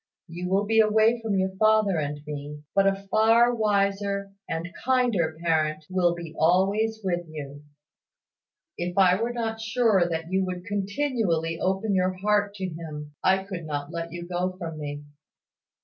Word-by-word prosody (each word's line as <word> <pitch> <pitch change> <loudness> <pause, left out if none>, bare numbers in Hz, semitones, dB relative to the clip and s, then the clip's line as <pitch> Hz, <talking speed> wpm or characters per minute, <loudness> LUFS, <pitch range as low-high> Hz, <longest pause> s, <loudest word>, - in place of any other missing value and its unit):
You 175 +2 -5
will 195 +2 +2
be 225 +2 +3
away 220 +2 +4
from 215 -3 -1
your 190 0 0
father 215 -4 +3
and 145 0 -3
me; 150 0 -7
but 195 0 +4
a 195 0 -1
far 230 +2 +5
wiser 200 -2 0 0.2
and 170 +2 -4
kinder 235 -12 +1
parent 155 -2 +1
will 175 -2 +2
be 170 -2 -8
always 200 +6 +2
with 175 -2 -1
you. 145 -2 -8 1.2
If 175 +1 -3
I 185 +1 +5
were 235 +1 0
not 225 -2 -3
sure 225 -6 +2
that 165 +1 -4
you 190 0 +2
would 180 -1 -5
continually 205 - -1
open 190 +3 0
your 185 0 +2
heart 205 +1 +1
to 190 -2 -4
Him, 155 -3 -7
I 190 +1 +3
could 185 -5 -7
not 145 0 -4
let 170 0 -5
you 175 0 -7
go 180 +1 -2
from 165 -4 -6
me." 145 0 -5
185 Hz, 165 wpm, -26 LUFS, 165-210 Hz, 1.2 s, far